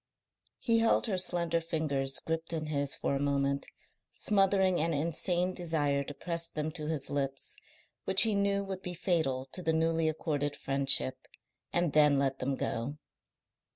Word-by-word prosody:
He 230 Hz, -2 st, +1 dB
held 225 Hz, 0 st, +3 dB
her 195 Hz, -5 st, +1 dB
slender 170 Hz, -2 st, +1 dB
fingers 145 Hz, -5 st, -1 dB
gripped 165 Hz, +1 st, -2 dB
in 155 Hz, -1 st, -3 dB
his 145 Hz, -2 st, -1 dB
for -, -, -2 dB
a -, -, -1 dB
moment, 140 Hz, 0 st, -1 dB, 0.4 s
smothering 195 Hz, -3 st, +2 dB
an 165 Hz, 0 st, 0 dB
insane 175 Hz, +4 st, 0 dB
desire 150 Hz, -5 st, -1 dB
to 145 Hz, -, -8 dB
press 170 Hz, +1 st, -3 dB
them 155 Hz, +1 st, -4 dB
to 155 Hz, -2 st, -4 dB
his 155 Hz, -4 st, -2 dB
lips, 135 Hz, -1 st, -3 dB, 0.5 s
which 190 Hz, 0 st, +8 dB
he 220 Hz, -2 st, +2 dB
knew 200 Hz, 0 st, +1 dB
would 190 Hz, -1 st, -6 dB
be 180 Hz, -1 st, -5 dB
fatal 160 Hz, -8 st, -1 dB
to 185 Hz, -, -4 dB
the 160 Hz, -2 st, 0 dB
newly 165 Hz, 0 st, +1 dB
accorded 145 Hz, -2 st, -2 dB
friendship, 135 Hz, -, +3 dB, 0.4 s
and 175 Hz, -3 st, 0 dB
then 150 Hz, -2 st, +5 dB
let 135 Hz, -1 st, -1 dB
them 135 Hz, +1 st, -2 dB
go. 130 Hz, +4 st, -4 dB
160 Hz, 160 wpm, -30 LUFS, 140-175 Hz, 0.5 s, which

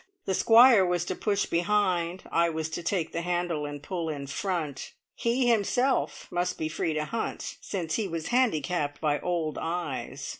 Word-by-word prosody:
The 190 Hz, -, 0 dB
Squire 230 Hz, +1 st, +7 dB
was 175 Hz, -1 st, 0 dB
to 185 Hz, -, -3 dB
push 200 Hz, 0 st, 0 dB
behind; 180 Hz, -1 st, 0 dB
I 170 Hz, 0 st, +3 dB
was 160 Hz, -1 st, -3 dB
to 160 Hz, -, -4 dB
take 170 Hz, -2 st, -1 dB
the 170 Hz, -, -2 dB
handle 175 Hz, -3 st, -1 dB
and 145 Hz, 0 st, -7 dB
pull 170 Hz, -1 st, -3 dB
in 145 Hz, -2 st, -4 dB
front; 155 Hz, -1 st, -3 dB, 0.2 s
he 245 Hz, +2 st, +1 dB
himself 245 Hz, +4 st, +1 dB
must 180 Hz, 0 st, -1 dB
be 155 Hz, -, -2 dB
free 160 Hz, 0 st, -1 dB
to 155 Hz, 0 st, -1 dB
hunt, 225 Hz, +7 st, -4 dB
since 170 Hz, -5 st, -3 dB
he 215 Hz, -3 st, -1 dB
was 165 Hz, -2 st, -4 dB
handicapped 175 Hz, -, +1 dB
by 150 Hz, -2 st, +1 dB
old 170 Hz, -4 st, -2 dB
eyes. 150 Hz, -5 st, -4 dB
175 Hz, 175 wpm, -28 LUFS, 155-200 Hz, 0.2 s, Squire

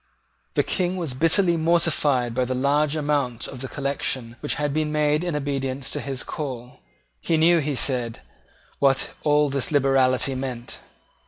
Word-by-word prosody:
The -, -, +3 dB
King 185 Hz, 0 st, -1 dB
was 165 Hz, -7 st, -3 dB
bitterly 165 Hz, +5 st, +3 dB
mortified 155 Hz, -7 st, +2 dB
by 130 Hz, +1 st, +1 dB
the 130 Hz, +1 st, -2 dB
large 145 Hz, +3 st, +1 dB
amount 145 Hz, -6 st, -1 dB
of 130 Hz, -, -8 dB
the 135 Hz, -, -4 dB
collection 135 Hz, -4 st, -2 dB
which 145 Hz, -, -2 dB
had 145 Hz, -2 st, -1 dB
been 155 Hz, 0 st, 0 dB
made 150 Hz, +1 st, +1 dB
in 175 Hz, -3 st, -2 dB
obedience 140 Hz, -2 st, -2 dB
to -, -, -3 dB
his 135 Hz, -2 st, -3 dB
own -, -, -15 dB
call. 130 Hz, -6 st, -6 dB, 0.4 s
He 165 Hz, -, 0 dB
knew, 170 Hz, +2 st, +5 dB
he 145 Hz, -1 st, -1 dB
said, 125 Hz, -3 st, 0 dB, 0.6 s
what 135 Hz, -1 st, +2 dB
all 150 Hz, 0 st, +3 dB
this 140 Hz, +1 st, -1 dB
liberality 135 Hz, -2 st, +3 dB
meant. 130 Hz, -2 st, -5 dB
140 Hz, 165 wpm, -24 LUFS, 130-150 Hz, 0.6 s, knew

